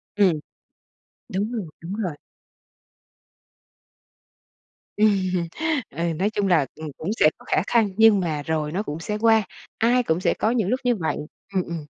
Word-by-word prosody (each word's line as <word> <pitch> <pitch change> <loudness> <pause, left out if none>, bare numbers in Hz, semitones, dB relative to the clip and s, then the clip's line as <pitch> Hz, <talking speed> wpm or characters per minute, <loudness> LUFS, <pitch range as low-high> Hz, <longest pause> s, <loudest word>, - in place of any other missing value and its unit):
Ừm. 185 -7 +3 0.9
Đúng 205 +5 -2
rồi, 215 -7 -3 0.2
đúng 170 - -6
rồi. 185 -8 -3 2.8
Ừm. 185 -5 +2 0.4
Ừ, 170 +3 -2
nói 190 +6 +1
chung 205 -2 -1
là, 165 -6 +4
ừm, 155 0 -7
cũng 170 - -4
sẽ 155 - +7
có - - -18
khả - - +2
khăn 225 -4 +3
nhưng 220 -3 +7
mà 155 -5 -2
rồi 155 -1 -1
nó 195 +6 -1
cũng 150 -3 -5
sẽ 210 +6 -3
qua, 225 0 +4 0.3
ai 245 +2 +3
cũng 160 -4 0
sẽ - - +2
có 220 - 0
những 220 -6 +1
lúc 255 - +1
như 245 -1 +2
vậy, 165 -6 -2 0.4
ừm, 185 -2 +1
ừm. 165 -3 -6
190 Hz, 165 wpm, -24 LUFS, 165-215 Hz, 2.8 s, sẽ